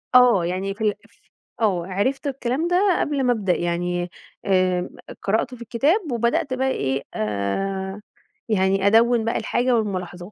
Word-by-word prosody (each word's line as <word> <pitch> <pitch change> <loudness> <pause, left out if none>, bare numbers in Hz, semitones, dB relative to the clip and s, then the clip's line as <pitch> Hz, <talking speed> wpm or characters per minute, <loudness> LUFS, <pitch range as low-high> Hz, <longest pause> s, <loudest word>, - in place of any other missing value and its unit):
آه، 245 -8 +6
يعني 185 +3 -2
في 210 - -6
ال 210 -1 +3 0.7
آه، 185 -6 +1
عرفت 230 +10 -1
الكلام 270 +3 -1
ده 360 +1 +3
قبل 285 -2 0
ما 250 -1 +3
أبدأ 200 -5 0
يعني، 175 +1 -1 0.4
آآ، 185 -2 +2 0.3
قرأت 225 +5 0
في 240 - -16
الكتاب 290 - +1
وبدأت 235 +4 0
بقى 260 +1 0
إيه، 135 - -1
آآ، 190 - -2 0.5
يعني 195 -1 +2
أدوِّن 230 +2 +4
بقى 230 - 0
الحاجة 245 +3 +1
والملاحظات. 180 -3 -4
205 Hz, 145 wpm, -23 LUFS, 185-250 Hz, 0.7 s, آه